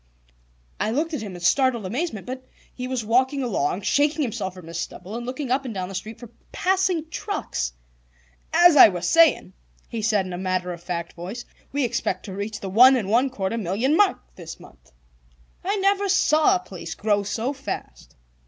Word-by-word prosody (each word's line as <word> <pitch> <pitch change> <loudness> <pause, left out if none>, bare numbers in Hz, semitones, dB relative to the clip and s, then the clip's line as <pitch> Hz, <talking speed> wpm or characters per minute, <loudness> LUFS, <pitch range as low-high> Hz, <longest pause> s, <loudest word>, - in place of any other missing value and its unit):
I - - 0
looked 310 +8 -1
at 295 - -2
him 200 -4 -7
in 175 - -9
startled 240 +3 +2
amazement, 230 - -3
but 255 +1 -7 0.3
he 250 0 -5
was 255 -4 -3
walking 260 +5 +2
along, 185 - -1
shaking 295 +5 +2
himself 190 -6 -3
from 180 -3 -11
his 165 0 -6
stumble, 190 +5 -6
and 240 +1 -5
looking 255 0 -4
up 270 +2 +1
and 240 -5 -6
down 185 -1 -3
the - - -8
street 215 +4 -6
for 240 -1 -11 0.2
passing 370 -3 +1
trucks. 345 - -3 0.8
"As 345 0 +6
I 280 - +10
was 180 -4 -3
saying," 325 - +4 0.4
he 230 - -4
said 210 -3 +1
in 185 - -6
a 175 - -5
matter 185 -1 -1
of 170 - -10
fact 170 -1 -5
voice, 190 +8 -7 0.3
"we 285 0 0
expect 230 -6 -2
to 195 - -7
reach 205 +2 -4
the 195 - -5
one 250 +7 +7
and 210 -6 -2
one 250 +4 +3
quarter 225 -2 -3
million 220 - 0
mark 405 +1 +4 0.2
this 165 -3 -9
month. - - -18 0.7
I 395 +3 0
never 395 0 +1
saw 360 0 +4
a - - 0
place 180 - -8
grow 205 -1 +1
so 225 +6 -2
fast." 275 0 -7
230 Hz, 195 wpm, -24 LUFS, 190-285 Hz, 0.8 s, I